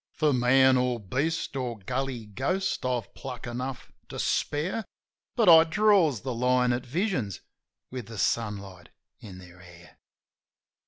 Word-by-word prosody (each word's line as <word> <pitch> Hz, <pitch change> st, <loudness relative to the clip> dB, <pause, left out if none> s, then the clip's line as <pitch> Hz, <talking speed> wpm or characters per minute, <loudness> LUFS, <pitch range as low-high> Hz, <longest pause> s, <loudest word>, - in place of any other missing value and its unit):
For 150 Hz, -2 st, +1 dB
man 130 Hz, +1 st, +5 dB
or 125 Hz, -1 st, 0 dB
beast 135 Hz, -, -2 dB
or 125 Hz, -3 st, -3 dB
gully 125 Hz, +2 st, -4 dB
ghost 180 Hz, -, -2 dB
I've 120 Hz, -5 st, -3 dB
pluck 125 Hz, -3 st, -8 dB
enough 125 Hz, +2 st, -5 dB, 0.2 s
to -, -, -7 dB
spare; 170 Hz, +10 st, -1 dB, 0.5 s
But 230 Hz, -5 st, +2 dB
I 165 Hz, -2 st, +9 dB
draws 170 Hz, -, +3 dB
the 130 Hz, -1 st, -3 dB
line 125 Hz, +1 st, +2 dB
at 125 Hz, +1 st, -4 dB
visions 135 Hz, -, -2 dB, 0.5 s
with 125 Hz, -4 st, -6 dB
the 115 Hz, -1 st, -9 dB
sunlight 100 Hz, -4 st, -2 dB, 0.3 s
in 95 Hz, -4 st, -11 dB
their 90 Hz, -1 st, -14 dB
hair. 85 Hz, -1 st, -16 dB
125 Hz, 140 wpm, -27 LUFS, 110-145 Hz, 0.5 s, I